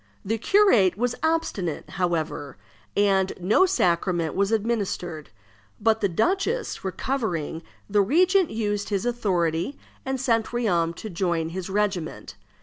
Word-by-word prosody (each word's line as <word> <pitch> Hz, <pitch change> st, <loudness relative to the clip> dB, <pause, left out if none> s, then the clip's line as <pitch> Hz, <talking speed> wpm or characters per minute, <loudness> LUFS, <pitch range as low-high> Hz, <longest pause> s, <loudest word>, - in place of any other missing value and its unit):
The 225 Hz, +3 st, -1 dB
curate 235 Hz, -, +4 dB
was 245 Hz, +1 st, 0 dB
obstinate, 320 Hz, -, -1 dB
however, 165 Hz, -, -2 dB, 0.4 s
and 195 Hz, -2 st, +3 dB
no 210 Hz, -, +4 dB
sacrament 175 Hz, -, +1 dB
was 200 Hz, +2 st, +1 dB
administered; 200 Hz, -8 st, -2 dB, 0.5 s
but 225 Hz, 0 st, +2 dB
the 200 Hz, -, +2 dB
duchess 390 Hz, -, 0 dB
recovering, 190 Hz, -, -2 dB, 0.3 s
the 205 Hz, 0 st, +3 dB
regent 360 Hz, -, +3 dB
used 205 Hz, -2 st, -2 dB
his 200 Hz, +1 st, -1 dB
authority, 185 Hz, -, 0 dB, 0.3 s
and 265 Hz, 0 st, -2 dB
sent 230 Hz, -4 st, +1 dB
Riom 175 Hz, -9 st, 0 dB
to 215 Hz, -, -7 dB
join 170 Hz, -2 st, -1 dB
his 185 Hz, +2 st, -5 dB
regiment. 195 Hz, -5 st, -2 dB
200 Hz, 125 wpm, -25 LUFS, 175-240 Hz, 0.5 s, curate